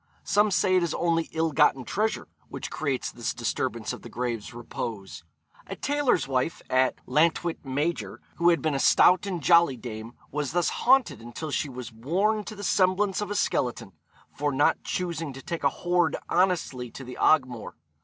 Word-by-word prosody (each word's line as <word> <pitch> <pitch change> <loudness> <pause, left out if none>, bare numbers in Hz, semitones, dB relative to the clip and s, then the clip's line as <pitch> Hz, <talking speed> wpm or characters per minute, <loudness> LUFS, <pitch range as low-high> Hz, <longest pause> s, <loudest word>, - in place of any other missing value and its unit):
Some 210 +1 +3
say 185 -1 +2
it - - +3
is 170 -2 -1
only 165 -1 0
ill 160 0 0
gotten 145 -4 +3
treasure 215 +3 -1 0.2
which - - -6
creates 135 -4 -2
this 120 -1 -4
disturbance - - -2
of - - -9
the - - -10
grave's 120 -3 -3
repose. 115 -5 -6 0.4
A - - -5
tailor's 285 - +1
wife 130 +4 -1
at 130 0 +3
Llantwit 165 +2 +1
Major, 145 +5 -2 0.2
who 170 0 +4
had 170 - +2
been 155 -2 +1
a 135 - 0
stout 185 +7 +5
and 175 -6 -3
jolly 170 -6 +5
dame, 115 -1 -7 0.2
was 145 0 -2
thus 175 0 +2
haunted 255 - +2
until 120 +7 -6
she 140 - -1
was 125 -3 -8
worn 190 - 0
to 215 - -7
the 205 - -8
semblance 195 +1 +2
of 205 - -3
a 205 - -3
skeleton, 120 - -1 0.4
'for 145 +1 0
not 145 +4 +2
choosing 165 -5 -3
to 135 - -9
take 170 -3 -5
a 140 - +5
hoard 175 +1 +1
honestly 170 -9 +1
to 135 - -10
the 125 0 -9
Ogmore.' 130 -7 +2
155 Hz, 180 wpm, -26 LUFS, 130-180 Hz, 0.4 s, stout